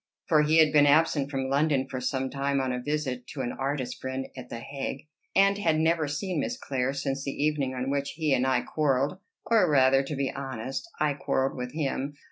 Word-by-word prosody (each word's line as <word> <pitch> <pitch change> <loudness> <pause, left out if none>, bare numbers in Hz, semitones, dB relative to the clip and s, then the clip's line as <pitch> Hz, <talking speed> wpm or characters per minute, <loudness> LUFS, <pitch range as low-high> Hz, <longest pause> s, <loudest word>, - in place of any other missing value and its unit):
For 155 -2 +4
he 155 +2 +3
had 155 -2 +5
been 145 -1 +6
absent 145 -1 +3
from 135 -2 -2
London 140 -1 +1
for 130 -1 -5
some 130 +1 -1
time 140 0 0
on 130 -1 0
a 125 0 -3
visit 130 -3 -3
to 135 - -3
an 120 -1 -2
artist 135 -2 -3
friend 130 0 -4
at 125 -2 -9
the - - -5
Hague, 135 +3 -5 0.3
and 200 +1 +4
had 160 -5 +2
never 160 -1 +2
seen 155 +4 -2
Miss 240 - -2
Clare 135 - -1
since 135 0 -3
the 140 - -3
evening 145 -4 0
on 130 +2 -2
which 140 0 -1
he 155 -3 +1
and 130 0 +2
I 130 -2 +2
quarrelled 145 +4 0 0.3
or 220 -7 +4
rather, 135 -2 +5
to 140 +2 -5
be 135 -1 -1
honest, 135 - -5
I 150 -1 +2
quarrelled 135 -1 -1
with 125 0 -5
him. 145 -2 -2
140 Hz, 215 wpm, -27 LUFS, 130-150 Hz, 0.3 s, been